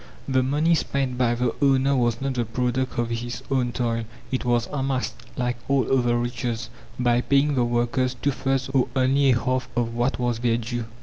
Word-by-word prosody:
The 130 -1 +2
money 150 +6 +2
spent 135 -4 0
by 120 -2 +2
the 120 -1 0
owner 135 0 +4
was 120 -2 +1
not 135 0 -1
the 120 -2 0
product 125 +3 -1
of 120 0 0
his 120 +1 -4
own 125 -2 +1
toil. 115 -2 -1 0.3
It 130 - -1
was 120 -1 +2
amassed, 135 -2 -1 0.2
like 125 -1 -1
all 135 -2 +2
other 120 -2 +2
riches, 120 -1 -3 0.3
by 120 -1 +3
paying 140 +3 +2
the 125 -3 +2
workers 120 +2 0
two 145 - 0
thirds 135 -1 -1
or 135 -2 +2
only 135 +1 +3
a 120 -2 +4
half 130 +2 -1
of 120 -1 0
what 120 +3 0
was 120 -2 -1
their 120 -1 +2
due. 120 0 -4
125 Hz, 195 wpm, -24 LUFS, 120-135 Hz, 0.3 s, owner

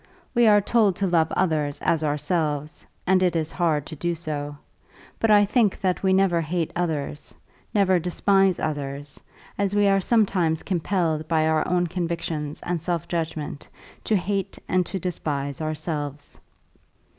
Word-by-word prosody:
We 240 -2 +4
are 205 -1 +6
told 210 -2 +2
to 200 - -1
love 165 -3 +2
others 155 -5 0
as 160 -2 +1
ourselves, 150 -1 -1 0.2
and 185 0 +3
it 180 -2 +2
is 160 -1 -1
hard 160 -5 0
to 155 - -8
do 175 +3 -2
so. 145 -3 -5 0.6
But 225 - +1
I 205 -1 +6
think 210 -1 +2
that 185 -2 0
we 190 - +2
never 190 -3 +3
hate 165 +1 -2
others, 155 -4 -3 0.4
never 190 -3 +3
despise 190 +2 +2
others, 145 -2 -4 0.4
as 200 0 0
we 205 0 +4
are 195 0 +3
sometimes 185 -7 +2
compelled 170 -4 -1
by 160 -1 +2
our 160 -1 +1
own 180 0 +2
convictions 165 -3 -3
and 175 -2 -2
self 170 -1 -2
judgment 160 -4 -4 0.4
to 220 - +2
hate 195 0 -2
and 185 0 +2
to 195 - -1
despise 150 -6 -3
ourselves. 150 -2 -4
170 Hz, 155 wpm, -24 LUFS, 155-190 Hz, 0.6 s, are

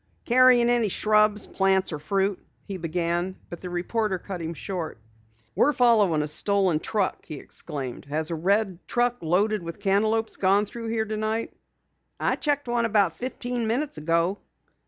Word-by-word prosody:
"Carrying 250 -1 +5
any 240 -2 +3
shrubs, 210 +1 +3
plants 190 -2 +1
or 150 - -4
fruit?" 195 +5 -1 0.2
he 195 -2 -5
began 175 +2 -2 0.2
but 175 - -7
the 180 - -6
reporter 190 +3 -1
cut 180 0 -7
him 165 +1 -4
short. 175 -6 -5 0.6
"We're 295 - +3
following 210 - +3
a - - -3
stolen 185 +1 +1
truck!" 210 +2 -1
he 155 - -8
exclaimed. 140 -3 -6
"Has 155 +3 -2
a - - -1
red 190 +2 +1
truck 245 0 +1
loaded 200 +6 +1
with 170 +3 -7
cantaloupes 215 +3 +1
gone 200 +2 +3
through 230 +2 -7
here 225 -1 -1
tonight?" 215 +1 -2 0.7
"I - - +1
checked 290 -2 -1
one 240 -1 +1
about 200 -7 +3
fifteen 245 -2 -3
minutes 255 - -1
ago." 170 +5 +1
200 Hz, 155 wpm, -25 LUFS, 175-225 Hz, 0.7 s, Carrying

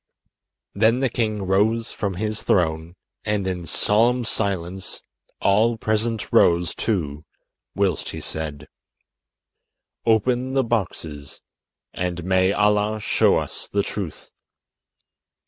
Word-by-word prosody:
Then 110 +4 +3
the 135 -1 +1
king 110 -4 -1
rose 105 +5 +1
from 100 -3 -3
his 105 +3 -2
throne, 80 -1 0 0.3
and 105 -2 -1
in 90 -3 -3
solemn 120 +8 +3
silence 95 -4 -2 0.4
all 110 +4 +3
present 110 0 -1
rose 85 0 +4
too, 75 -9 -2 0.5
whilst 95 -6 0
he - - -5
said: 75 -2 -5 1.4
"Open 125 +3 +2
the 135 - +3
boxes, 85 - -3 0.5
and 90 -1 -3
may 95 +1 +3
Allah 105 +1 +2
show - - +3
us - - -4
the 100 0 0
truth." 95 -6 -6
100 Hz, 110 wpm, -23 LUFS, 90-110 Hz, 1.4 s, rose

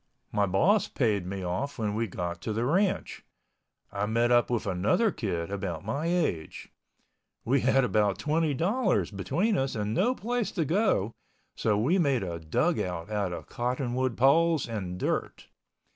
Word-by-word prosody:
My 100 -1 +1
boss 180 - +3
paid 105 -8 0
me 95 0 -4
off 95 +11 -3
when 105 -3 -1
we 115 +2 -1
got 85 -2 -4
to 110 - -3
the 115 +3 -1
ranch. 185 +8 0 0.7
I 100 +1 -2
met 115 +2 +2
up 120 0 +4
with 120 -3 -1
another 100 - +2
kid 90 -5 -3
about 95 -4 -4
my 140 +9 -2
age. 170 - -2 0.7
We 130 +3 +2
had 135 +1 +3
about 105 -5 +2
$20.00 165 - 0
between 180 - 0
us 135 0 -1
and 105 0 -2
no 240 - +2
place 240 -1 -2
to 165 -5 0
go. 165 - +1 0.4
So 105 -2 +1
we 150 - +2
made 140 - +2
a 85 -2 -4
dugout 90 - -1
out 100 -3 -1
of 85 - -6
cottonwood 125 0 -2
poles 160 +4 +4
and 95 -6 -4
dirt. - - -3
115 Hz, 160 wpm, -28 LUFS, 100-160 Hz, 0.7 s, up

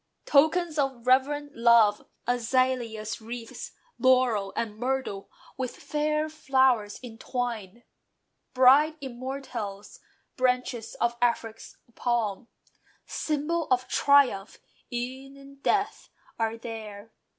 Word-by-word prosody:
Tokens 315 +2 +3
of 265 -4 -1
reverent 285 +3 +2
love, 230 -3 +4 0.2
azalea 245 -2 0
wreaths, 235 - -7 0.3
Laurel 250 -6 +3
and 215 -2 -2
myrtle, 250 -6 -2 0.3
with 260 -2 -3
fair 305 +1 -1
flowers 260 -8 +1
entwined, 235 -2 -5 0.7
Bright 285 +5 +6
immortelles, 250 -6 -6 0.4
branches 250 -2 0
of 235 0 0
Afric's 230 -2 -1 0.2
palm, 235 -2 -1 0.6
(Symbol 310 +2 -2
of 255 0 +2
triumph 260 -10 +3 0.3
e'en 260 +3 -5
in 275 0 -14
death) 400 +8 -1 0.3
are 225 0 0
there. 220 -2 -8
250 Hz, 95 wpm, -27 LUFS, 225-275 Hz, 0.7 s, Bright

